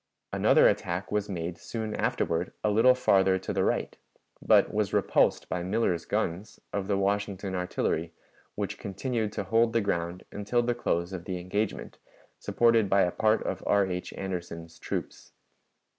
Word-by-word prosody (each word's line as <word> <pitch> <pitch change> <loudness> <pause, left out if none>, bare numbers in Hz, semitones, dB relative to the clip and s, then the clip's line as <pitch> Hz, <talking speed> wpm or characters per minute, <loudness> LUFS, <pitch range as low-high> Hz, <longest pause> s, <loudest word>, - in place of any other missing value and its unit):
Another - - +5
attack 85 +2 -1
was 105 -1 -1
made 85 -2 -4
soon 110 -2 -4
afterward 85 +2 -1
a 105 - +2
little 115 +5 +5
farther 95 -6 +3
to 95 - -4
the - - +1
right, - - -1 0.4
but - - +4
was - - 0
repulsed - - +2
by 90 - -2
Miller's 90 -3 0
guns, 95 +6 -3
of 100 -1 -2
the 100 -1 +1
Washington 100 -1 -1
Artillery, 90 -2 -1 0.4
which - - -4
continued 110 +2 -2
to 105 - -3
hold 115 +2 +2
the 115 - +3
ground 90 -3 -2
until 105 +4 0
the 120 0 +1
close 85 -6 -1
of 85 -2 -6
the 95 -2 -3
engagement, 95 +4 -3 0.4
supported 115 -3 +3
by 100 0 +4
a 90 - +1
part 110 +3 +2
of - - -3
R. 100 -1 +4
H. 90 -1 -4
Anderson's 85 -3 -6
troops. - - -5
95 Hz, 160 wpm, -28 LUFS, 90-110 Hz, 0.4 s, Another